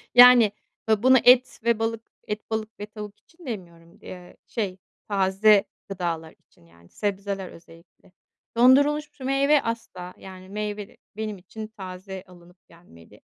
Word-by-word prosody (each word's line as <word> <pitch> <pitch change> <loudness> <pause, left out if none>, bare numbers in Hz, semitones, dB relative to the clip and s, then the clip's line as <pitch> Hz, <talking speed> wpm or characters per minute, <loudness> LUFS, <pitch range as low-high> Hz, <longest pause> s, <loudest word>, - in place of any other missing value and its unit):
Yani, 245 -4 +9 0.4
ya, 220 +1 +2
bunu 260 0 +7
et 255 +1 +5
ve 235 -1 +2
balık 225 0 -2 0.3
et, 210 0 -5
balık 220 -1 -4
ve 205 - -5
tavuk 210 -1 -10
için 340 0 -20
demiyorum 170 -7 -9
d - - -14
eee, 180 -1 -11
şey, 195 -2 -3 0.3
taze 195 +1 +4 0.2
gıdalar 170 -4 -4
için, 85 - -27
yani 85 0 -22
sebzeler 200 -2 -3
özellikle. 165 +2 -18 0.5
Dondurulmuş 285 +5 +4
şu 265 - -11
meyve 275 +2 +3
asla. 185 -6 -6
Yani 185 0 -12
meyve 210 0 -5 0.2
benim 215 -2 -4
için 215 +4 -9
taze 190 -2 -9
alınıp 175 0 -18
gelmeli. 165 - -19
205 Hz, 145 wpm, -25 LUFS, 185-230 Hz, 0.5 s, Yani